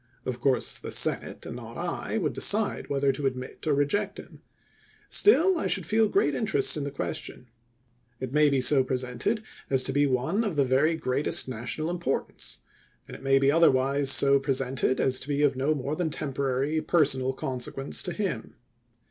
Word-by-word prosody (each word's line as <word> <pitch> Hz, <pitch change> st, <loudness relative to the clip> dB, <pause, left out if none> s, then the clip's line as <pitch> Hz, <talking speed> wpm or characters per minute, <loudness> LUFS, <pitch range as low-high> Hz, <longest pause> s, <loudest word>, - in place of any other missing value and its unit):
Of 125 Hz, -1 st, -4 dB
course 130 Hz, 0 st, +1 dB
the -, -, -7 dB
Senate, -, -, 0 dB
and -, -, -7 dB
not -, -, -9 dB
I, -, -, -3 dB
would -, -, -1 dB
decide -, -, +1 dB
whether 140 Hz, -1 st, +1 dB
to 135 Hz, +1 st, -2 dB
ad 130 Hz, -, -2 dB
mit 130 Hz, +4 st, -9 dB
or 150 Hz, -, +2 dB
reject 195 Hz, +9 st, -1 dB
him. -, -, -12 dB, 0.7 s
Still 380 Hz, -3 st, +4 dB
I -, -, -1 dB
should 190 Hz, -4 st, -1 dB
feel 220 Hz, +4 st, +2 dB
great 145 Hz, -8 st, +1 dB
interest 135 Hz, +1 st, +1 dB
in 150 Hz, -, -3 dB
the -, -, -3 dB
question. 125 Hz, -2 st, -6 dB, 0.7 s
It 130 Hz, 0 st, -6 dB
may 150 Hz, 0 st, +4 dB
be 135 Hz, -2 st, +1 dB
so 130 Hz, +1 st, +5 dB
presented 130 Hz, -, -2 dB, 0.3 s
as 130 Hz, -1 st, +3 dB
to 135 Hz, -, -2 dB
be 145 Hz, +1 st, +3 dB
one 135 Hz, -, 0 dB
of 205 Hz, -7 st, -2 dB
the 145 Hz, -, +3 dB
very 140 Hz, +6 st, +2 dB
greatest 135 Hz, -2 st, +1 dB
National 130 Hz, +6 st, -4 dB
importance; 170 Hz, -6 st, -3 dB, 0.5 s
and -, -, -9 dB
it -, -, -12 dB
may 135 Hz, 0 st, +3 dB
be 135 Hz, +1 st, +3 dB
other 165 Hz, +2 st, +5 dB
wise 135 Hz, +1 st, +1 dB
so 140 Hz, 0 st, +5 dB
presented 135 Hz, -1 st, -1 dB
as 130 Hz, -1 st, +3 dB
to -, -, -7 dB
be 145 Hz, 0 st, 0 dB
of 140 Hz, -2 st, +2 dB
no 140 Hz, +4 st, 0 dB
more 140 Hz, +2 st, -3 dB
than 170 Hz, 0 st, -1 dB
temporary 140 Hz, 0 st, -2 dB
personal 135 Hz, -7 st, +1 dB
consequence 130 Hz, +1 st, -3 dB
to 180 Hz, -, -3 dB
him. 180 Hz, -, -4 dB
140 Hz, 190 wpm, -27 LUFS, 130-155 Hz, 0.7 s, so